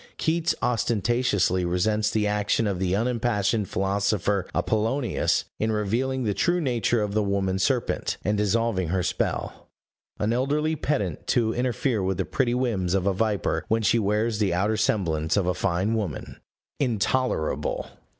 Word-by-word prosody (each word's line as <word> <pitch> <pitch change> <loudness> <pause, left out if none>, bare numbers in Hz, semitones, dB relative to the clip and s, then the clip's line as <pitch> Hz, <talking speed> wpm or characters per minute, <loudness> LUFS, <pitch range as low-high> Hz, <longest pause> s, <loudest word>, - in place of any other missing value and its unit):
Keats 165 0 +1
ostentatiously 115 -5 +1
resents 105 +5 +1
the 110 -1 0
action 105 +2 +1
of 100 -3 -1
the 95 0 +1
unimpassioned 110 -3 0
philosopher 100 0 0
Appollonius 115 +4 0
in 110 +1 +1
revealing 120 +5 -1
the 105 -3 0
true 175 - +1
nature 120 - +1
of 100 -1 -3
the 110 - +2
woman 100 -2 0
serpent, 120 +5 0
and 105 +2 +2
dissolving 105 -2 +1
her 90 +2 0
spell. - - -3 0.5
An 105 +2 0
elderly 150 +5 0
pedant 115 - -2
to 115 -3 +2
interfere 125 -2 0
with 95 -1 -1
the - - -1
pretty 125 -3 0
whims 100 -8 0
of 95 -1 0
a 100 - +2
viper 105 0 0
when 110 0 +1
she 115 +2 +3
wears 105 +2 0
the 95 -5 +1
outer 100 +4 +1
semblance 85 -7 0
of 100 - +2
a 90 - +1
fine 90 +4 0
woman! 100 -10 -4 0.4
Intolerable! 125 - 0
105 Hz, 150 wpm, -25 LUFS, 95-120 Hz, 0.5 s, she